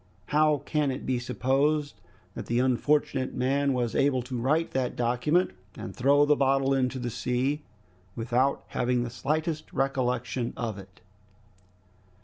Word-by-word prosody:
How 150 -1 +3
can 150 -2 +1
it 130 0 -4
be 130 -1 0
supposed 135 +5 0 0.3
that - - -7
the 120 - 0
unfortunate 130 +1 +1
man 140 +2 +1
was 120 -3 -1
able 135 -3 +2
to 125 +1 -6
write 155 +6 +1
that 130 -2 -1
document 125 +9 +1 0.2
and - - -7
throw 140 +3 +4
the 150 0 +4
bottle 135 0 +2
into 130 -1 0
the 120 -1 -3
sea 130 +6 -1 0.5
without 125 +4 0
having 125 0 0
the 120 - -5
slightest 155 +5 -2
recollection 125 -3 -1
of 110 -4 -3
it?" 95 -2 -15
130 Hz, 140 wpm, -27 LUFS, 125-145 Hz, 0.5 s, throw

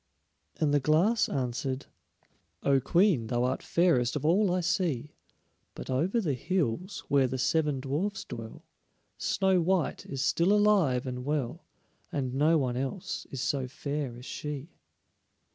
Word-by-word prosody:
And 150 -2 +2
the 145 - +4
Glass 165 - +3
answered: 130 +1 -2 0.8
"O 140 -1 +4
Queen, 170 - +2
thou 120 +1 0
art 130 +1 0
fairest 155 -9 +2
of - - -2
all 185 +4 +3
I 180 - +1
see, 165 - -1 0.6
But - - -6
over 170 - +1
the 165 -10 0
hills, 180 - -2
where 140 -2 +3
the 130 - -3
seven 150 +1 +1
dwarfs 185 +10 -2
dwell, 115 -1 -8 0.5
Snow 190 -2 +2
white 180 0 0
is 135 -1 -3
still 175 +4 +3
alive 195 -12 +3
and 125 -1 -4
well, 145 -3 -2 0.4
And 130 -3 -2
no 155 +4 +4
one 125 -4 -1
else 135 +8 -4
is 135 - -5
so 135 -2 -1
fair 140 -1 -4
as 125 - -11
she." 150 +2 -6
145 Hz, 145 wpm, -29 LUFS, 130-180 Hz, 0.8 s, the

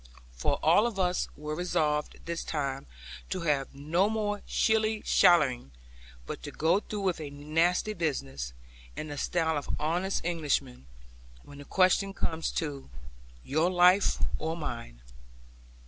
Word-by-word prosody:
For - - 0
all 175 +9 +5
of 225 -4 -5
us 180 -1 +1
were 150 +1 -4
resolved 155 -3 -1
this 170 0 -3
time 140 -3 -3 0.4
to 185 - -2
have 145 -5 0
no 165 +8 +1
more 210 -2 -1
shilly 220 -1 +1
shallying; 140 - +4 0.5
but - - -6
to - - -6
go 165 +5 +2
through 210 -1 -5
with 185 -4 0
a 150 - -5
nasty 165 +8 +1
business, 70 - -3 0.4
in 155 - -5
the 145 - -6
style 160 -3 0
of - - -4
honest 175 +6 -1
Englishmen, 145 - -1 0.6
when 145 0 -13
the 145 - -10
question 195 +3 +2
comes 160 0 -1
to 145 - -3 0.5
'Your 155 +5 +1
life 180 +2 +5 0.2
or 160 +1 -2
mine.' 115 - -6
160 Hz, 140 wpm, -29 LUFS, 145-185 Hz, 0.6 s, all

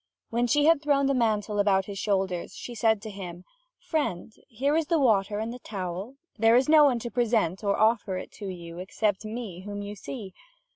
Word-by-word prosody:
When 240 +1 +1
she 290 +5 +3
had 325 -2 +5
thrown 285 -2 +2
the 275 - +2
mantle 215 -4 0
about 195 -2 +3
his 200 -1 -6
shoulders, 190 -4 -1
she 245 - -7
said 220 -2 +1
to 215 - -6
him: 180 -3 -8 0.3
"Friend, 225 - -2
here 275 +6 0
is 320 -2 +1
the 335 - +2
water 210 -7 +2
and 220 +2 -3
the 250 - -9
towel; 195 +3 -5 0.2
there 225 +1 +5
is 255 +1 +4
no 305 -1 +7
one 260 -4 +3
to 235 0 -5
present 220 -6 +1
or 200 -1 +1
offer 215 -4 +2
it - - -7
to 205 - -8
you 170 -2 -7
except 205 +2 -1
me 215 -5 -6
whom 205 +1 -6
you 205 0 -6
see. 205 -1 -8
215 Hz, 205 wpm, -27 LUFS, 195-245 Hz, 0.3 s, no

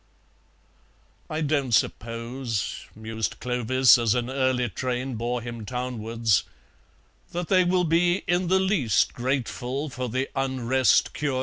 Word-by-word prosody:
"I 155 +1 -2
don't 140 -5 0
suppose," 115 +1 -2
mused 110 0 -4
Clovis, 125 +1 +4
as 115 -1 +2
an 125 +1 -1
early 130 -2 +1
train 130 +1 -3
bore 120 +1 -2
him 120 -2 -6
townwards, 115 -3 0 0.9
"that 175 0 -3
they 185 -2 +5
will 180 0 +2
be 175 +3 +2
in 175 +1 +1
the 190 +2 +3
least 180 - +2
grateful 130 +2 -2
for 125 0 -4
the 130 +4 -1
Unrest 130 -1 +2
cure." 140 -3 -1
130 Hz, 125 wpm, -25 LUFS, 115-140 Hz, 0.9 s, they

